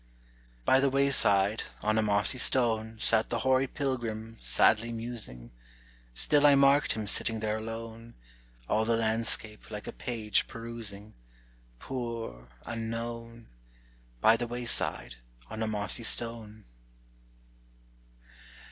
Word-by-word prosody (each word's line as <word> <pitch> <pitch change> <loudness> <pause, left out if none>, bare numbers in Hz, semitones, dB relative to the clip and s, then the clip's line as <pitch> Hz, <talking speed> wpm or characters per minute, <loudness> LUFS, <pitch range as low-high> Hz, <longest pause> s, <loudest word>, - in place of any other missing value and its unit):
By 130 - +5
the 140 0 +2
wayside, 115 -7 +3 0.2
on 110 +1 +1
a - - +3
mossy 105 +4 +1
stone, 110 -3 +3
Sat 110 0 +3
the 115 -1 -2
hoary 130 +1 +2
pilgrim, 115 -6 -4
sadly 115 +2 +3
musing; 115 - -7 0.6
Still 145 - +4
I 145 - +6
marked 140 +1 +4
him 110 -1 -5
sitting 110 +2 +1
there 110 0 -2
alone, 115 +1 -8 0.5
All 110 +1 +1
the 115 +1 +1
landscape, 110 -1 -1
like 105 -1 -7
a - - -6
page, 110 -4 -1
perusing; 115 -3 -9 0.6
Poor, 115 - -6 0.2
unknown! 115 0 -6 0.7
By 115 +1 +5
the 120 - -4
wayside, 120 - -1 0.3
on 110 - -6
a 110 - -1
mossy 105 +2 -1
stone. 110 -2 -2
115 Hz, 115 wpm, -29 LUFS, 110-120 Hz, 0.7 s, I